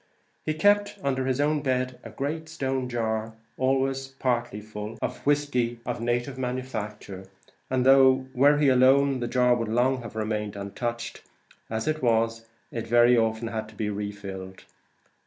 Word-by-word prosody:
He 155 - -1
kept 205 +4 +3
under 130 -1 0
his 130 0 0
own 150 +1 +2
bed 130 -2 -1
a - - -8
great 155 +3 -4
stone 135 -5 -2
jar, 110 -2 -2 0.2
always, 135 0 0
partly 120 -4 -2
at 105 - -8
least, 110 +1 -19
full 105 +1 -5
of 125 - -3
whiskey 125 -5 +1
of 120 -1 -3
native 120 +3 -1
manufacture; 110 -7 -5 0.4
and 130 -1 +1
though, 130 -1 +6
were 145 +3 +5
he 145 -1 +3
alone, 135 +1 +4
the 120 - -2
jar 125 0 +3
would 115 -2 -1
long 125 +3 +2
have 115 -2 -9
remained 105 -1 -2
untouched, 115 +4 -4 0.5
as 110 0 -3
it 155 0 0
was, 115 -1 +1 0.2
it 115 -1 -4
very 120 +1 +5
often 115 0 0
had 110 -1 -4
to 110 - -16
be 105 0 -2
refilled. 100 -2 -6
125 Hz, 165 wpm, -26 LUFS, 110-135 Hz, 0.5 s, though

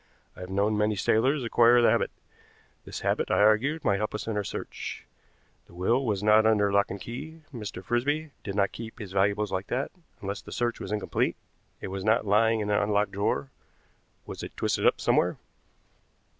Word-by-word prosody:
I - - -14
have 90 0 -7
known 100 +3 +1
many 105 0 +2
sailors 130 +8 +2
acquire 120 +1 +5
the 120 -2 +5
habit. 115 - +1 0.8
This - - -6
habit, - - 0
I - - +2
argued, 110 +10 +3
might 100 -4 +3
help 105 0 -2
us - - -4
in 110 - -3
our 105 - 0
search. - - -6 0.6
The 85 - -17
will 115 +9 +1
was 105 -5 -1
not 110 +1 +6
under 105 -2 +3
lock 100 0 +3
and 100 - -5
key, 150 - -8
Mr. 105 -6 -6
Frisby 145 - 0
did 100 - -5
not 100 -1 +2
keep 110 -1 -8
his 100 -4 -8
valuables 100 +2 +1
like 95 +1 -2
that; 130 +3 -2 0.3
unless 100 +1 -4
the - - -12
search 120 -1 -1
was 95 - -6
incomplete 105 -2 0 0.5
it - - -5
was 95 0 -4
not 110 +2 +2
lying 110 +2 +3
in 105 0 -2
an 105 - +3
unlocked 105 0 +1
drawer. 85 -9 -1 0.7
Was - - -7
it - - -8
twisted - - +1
up - - +3
somewhere?" - - +2
105 Hz, 195 wpm, -27 LUFS, 100-120 Hz, 0.8 s, not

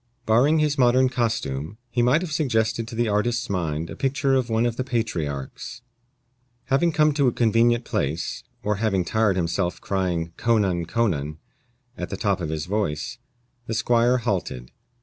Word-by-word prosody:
Barring 125 +8 +4
his 150 -2 +1
modern 130 +1 +5
costume, 110 - -2
he 120 - +1
might 125 +7 +4
have 180 -4 -4
suggested 115 -7 0
to 115 - -7
the 120 0 +1
artist's 110 +2 0
mind 80 -4 -2
a - - -8
picture 135 0 0
of 130 -2 +1
one 115 +1 +2
of 120 -1 0
the 130 - -2
Patriarchs. 90 - -3 0.8
Having 150 +5 +2
come 150 -1 +4
to 140 -2 +2
a - - +4
convenient 120 +1 +2
place, 75 +4 -2 0.2
or 105 -1 0
having 100 -4 +1
tired 110 +1 +2
himself 85 0 -1
crying 90 -4 -2
co 115 -1 +2
nan, 90 -5 0
co 115 +6 +1
nan, 75 -6 -2 0.6
at - - -5
the - - -4
top 100 -4 0
of 80 - -3
his 80 -1 -3
voice, 105 - -2 0.5
the 115 - -2
squire 120 +2 +3
halted. 95 - -3
110 Hz, 170 wpm, -24 LUFS, 90-125 Hz, 0.8 s, modern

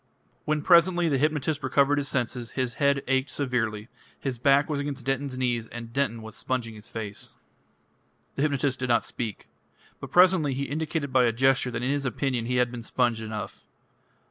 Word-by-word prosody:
When 150 -1 0
presently 175 0 +5
the 140 -3 +1
hypnotist 150 0 0
recovered 140 +2 +3
his 140 - -3
senses, 125 -3 -2
his 130 -2 -1
head 140 -1 +3
ached 135 +1 +1
severely, 115 -6 -2 0.3
his 130 -4 -4
back 140 +2 +4
was 150 -2 -2
against 140 -3 -4
Denton's 135 0 -1
knees 120 -3 -1
and 115 0 -9
Denton 115 -4 -1
was 110 -1 -9
sponging 120 -1 -3
his 105 0 -11
face. 105 -3 -6 1.0
The - - -3
hypnotist 140 -3 +1
did 125 -1 -2
not 120 - +3
speak. 110 -4 -5 0.5
But - - -8
presently 180 -6 +4
he 140 - -2
indicated 150 -1 -3
by 130 -1 +5
a 115 - +3
gesture 130 +2 +2
that 120 0 -4
in 130 - +1
his 140 -1 -1
opinion 125 -1 -1
he 125 - 0
had 125 -1 +2
been 120 -1 -6
sponged 115 -1 0
enough. 110 -1 -6
130 Hz, 185 wpm, -26 LUFS, 120-145 Hz, 1.0 s, presently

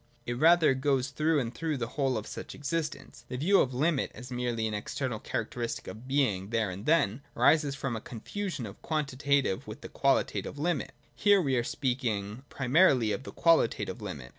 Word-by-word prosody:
It 120 - -2
rather 165 -2 +6
goes 135 -1 +1
through 155 +2 +1
and 120 -2 -3
through 155 +3 -2
the 115 -2 -3
whole 135 -2 0
of 110 - -4
such - - -7
existence. 155 +1 -4
The 125 - -5
view 190 +9 +4
of 130 - 0
limit, 140 +3 +1
as 125 0 -10
merely 120 -2 -1
an 110 - -2
external 125 +2 -3
characteristic 115 +1 -3
of 115 +4 -9
being 125 -9 +1
there 110 -4 0
and 100 +7 -8
then, 145 -7 +3 0.2
arises 150 -3 +4
from 135 -3 -3
a 110 - -5
confusion 145 - -5
of 100 -1 -10
quantitative 140 -7 0
with - - -9
qualitative - - +1
limit. 160 0 -1 0.2
Here 205 -1 +4
we 140 -7 +1
are 120 - +1
speaking 120 -3 -2
primarily 130 -4 +3
of 120 - -2
the - - -7
qualitative 160 -7 +2
limit. 75 -12 -6
130 Hz, 180 wpm, -29 LUFS, 115-150 Hz, 0.2 s, rather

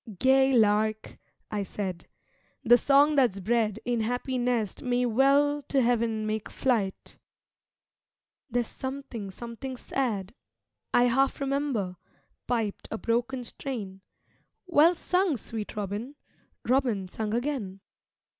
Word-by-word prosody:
'Gay 265 +4 +4
Lark,' 215 -2 +2 0.3
I 210 -1 -1
said, 190 -3 -5 0.6
'The 240 -1 +7
song 285 +4 +4
that's 245 -8 +3
bred 220 +1 0
In 245 -1 0
happy 245 +3 -2
nest 240 -5 -1
may 250 0 +1
well 280 +5 +3
to 275 - +2
heaven 230 -3 +1
make 215 0 -3
flight.' 220 -7 -1 1.3
'There's 240 0 0
something, 260 -5 -6
something 235 +5 -7
sad, 220 -8 -2 0.6
I 245 - +5
half 265 +3 +2
remember' 270 -10 -1 0.5
piped 225 -4 -2
a 220 - -3
broken 245 +3 -1
strain. 215 -6 -6 0.6
Well 340 0 +5
sung, 360 -3 +1
sweet 220 0 -6
Robin! 210 +7 -4 0.5
Robin 240 -7 +1
sung 215 +3 -3
again. 235 -7 -3
240 Hz, 115 wpm, -28 LUFS, 215-265 Hz, 1.3 s, The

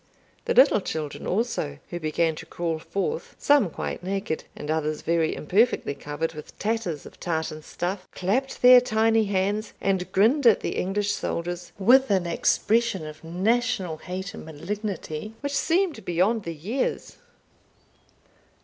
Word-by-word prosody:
The - - 0
little 260 -4 +6
children 155 -5 -4
also, 195 - -1
who 175 - -3
began 160 +1 +1
to - - -9
crawl 165 -2 -2
forth, 195 - -3
some 285 -10 +4
quite - - -5
naked, 195 -3 -3
and 150 +1 -4
others 155 -1 -1
very 165 -1 +1
imperfectly 200 -1 +1
covered 145 +3 -4
with 150 -1 -11
tatters 210 -9 -2
of - - -13
tartan 160 -2 -2
stuff, 180 +4 -4
clapped 250 +11 -1
their 250 0 +10
tiny 225 -1 +2
hands, 200 +2 -1
and 190 -2 -1
grinned 240 +8 +4
at 225 - +5
the - - -3
English 205 +2 0
soldiers, 175 -1 -4
with 250 +7 +5
an 190 -3 +2
expression 200 +2 +1
of 155 +1 -10
national 190 0 0
hate 185 +4 -6
and - - -8
malignity 190 +3 -5
which 285 0 -3
seemed 335 - +1
beyond 195 +6 +1
their 170 - -3
years. 210 - -3
190 Hz, 145 wpm, -25 LUFS, 165-225 Hz, -, their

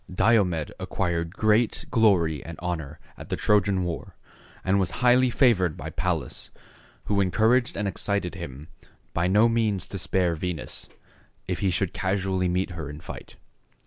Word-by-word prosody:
Diomed 90 -6 +2
acquired 85 -1 -2
great 110 +2 +2
glory 90 - +3
and 85 -1 -8
honor 80 -4 -4 0.2
at - - -10
the - - 0
Trojan 100 -2 +2
war, 85 -2 -5 0.5
and 95 +1 +3
was 95 - +1 0.2
highly 125 +1 +5
favored 110 - +3
by - - -6
Pallas, 85 -8 -3 0.6
who 100 -1 +1
encouraged 115 +7 +2
and 100 0 -1
excited 100 -1 -1
him 75 -6 -8 0.5
by 85 +1 +1
no 105 +5 +5
means 110 -5 0
to 95 - -5
spare 90 -1 +1
Venus, 85 -1 -5 0.6
if 90 - -2
he 100 -1 +1
should 90 0 -1
casually 95 -1 0
meet 90 +1 0
her 80 -4 -6
in 75 +1 -8
fight. - - -10
95 Hz, 150 wpm, -26 LUFS, 85-105 Hz, 0.6 s, highly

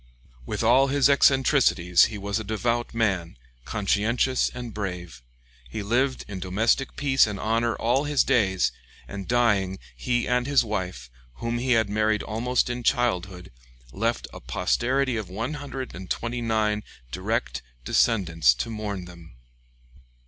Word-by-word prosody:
With 105 +1 -2
all 130 +4 +5
his 140 0 +3
eccentricities, 135 - +4
he 110 - -5
was 100 +2 -2
a - - -5
devout 115 +3 -1
man, 95 - -1 0.3
conscientious 115 +5 +1
and 120 -3 -7
brave. 90 -9 -5 0.5
He 100 - -5
lived 130 +5 0
in 95 -2 -6
domestic 110 +8 0
peace 135 -4 +3
and 105 -2 -5
honor 115 +2 0
all 125 +5 +1
his 145 -2 +2
days, 95 -6 +2 0.4
and 100 -2 -7
dying, 105 -6 +2 0.2
he 120 -1 -1
and 125 0 +1
his 140 -2 +4
wife, 90 - -4 0.2
whom 115 - -3
he 125 +1 +1
had 110 -2 +3
married 110 +1 +1
almost 120 +3 0
in 125 0 -3
childhood, 95 -7 -1 0.4
left - - -1
a - - -8
posterity 120 - 0
of 105 -5 -5
129 115 -3 -3 0.3
direct - - -2 0.2
descendants 80 - +3
to 65 - -4
mourn 105 -4 -4
them. 85 -6 -14
110 Hz, 135 wpm, -25 LUFS, 95-125 Hz, 0.5 s, all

